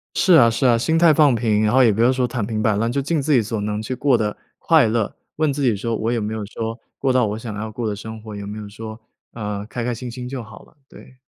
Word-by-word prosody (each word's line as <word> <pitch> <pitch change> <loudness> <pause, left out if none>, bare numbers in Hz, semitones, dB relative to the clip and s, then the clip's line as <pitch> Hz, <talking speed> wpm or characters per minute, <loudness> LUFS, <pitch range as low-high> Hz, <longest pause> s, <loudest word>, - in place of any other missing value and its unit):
是 180 0 +4
啊 120 -8 +7
是 115 +4 0
啊， 120 -2 +5
心 160 +8 +1
态 165 -2 +6
放 145 -3 +5
平， 110 -2 +1
然 105 - +2
后 130 +1 +5
也 115 - +5
不 105 - -2
要 120 +2 +5
说 130 -1 +1
躺 120 -2 -3
平 110 0 -3
摆 110 -2 +2
烂， 115 +3 0
就 140 +3 0
尽 150 +2 -1
自 150 - 0
己 130 - +5
所 110 0 -3
能 105 0 -2
去 110 +4 -4
过 130 -2 +2
得 105 -1 -2 0.2
快 160 -7 +4
乐。 110 -1 -1 0.2
问 155 -2 +1
自 140 +1 -3
己 120 -5 +2
说： 115 +3 -2
“我 110 +2 -1
有 120 - 0
没 105 +1 -3
有 110 -1 -4
说， 115 +2 -5 0.2
过 135 -2 +1
到 125 -3 +3
我 105 +1 -3
想 115 -2 -6
要 110 +1 -4
过 110 +1 -3
的 105 - -2
生 110 +2 -8
活。 110 -1 -9
有 100 0 -7
没 105 +1 -6
有 105 -1 -7
说， 110 +2 -9 0.3
呃， 105 -2 -4
开 115 +1 -5
开 120 0 -1
心 125 +1 -7
心。” 125 +1 -7
就 130 -1 -5
好 110 -3 -13
了， - - -25
对。 130 0 -16
115 Hz, 320 characters per minute, -21 LUFS, 110-130 Hz, 0.3 s, 啊